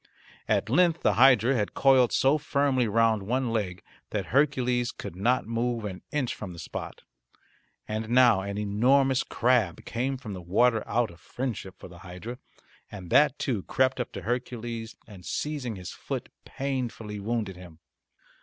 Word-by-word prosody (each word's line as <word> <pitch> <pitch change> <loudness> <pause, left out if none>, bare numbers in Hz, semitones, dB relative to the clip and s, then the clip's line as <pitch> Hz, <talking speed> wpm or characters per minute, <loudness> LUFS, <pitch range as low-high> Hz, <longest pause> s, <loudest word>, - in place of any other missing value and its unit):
At - - +1
length 170 +7 +3
the - - +4
hydra 130 0 +5
had 105 -5 -1
coiled 130 -3 +5
so 140 +3 +3
firmly 140 -4 +1
round 110 0 +2
one 125 +4 -1
leg, 95 -6 -2 0.3
that - - -2
Hercules 125 -4 +2
could - - -8
not 120 +7 +1
move 115 0 -2
an 95 -3 -6
inch 140 -5 -1
from 95 -4 -7
the - - -11
spot. 80 - -7 0.8
And 110 +1 -3
now 120 -5 +5
an 100 +1 -4
enormous 125 +6 +3
crab 120 -8 +1
came 130 +3 -2
from 120 -6 -7
the 90 - -7
water 110 +6 +2
out 120 -3 0
of 85 - -16
friendship 110 0 -5
for - - -11
the 85 -1 -13
hydra, 90 +8 -8 0.5
and 95 -4 -9
that 150 -2 +5
too 115 -7 -1
crept 130 +6 +1
up 125 - -3
to - - -6
Hercules 120 -1 -4
and, 100 -5 -13
seizing 125 - -3
his 90 -2 -7
foot, - - -5 0.2
painfully 120 -6 -4
wounded 105 -2 -2
him. 90 -3 -13
115 Hz, 165 wpm, -27 LUFS, 100-130 Hz, 0.8 s, hydra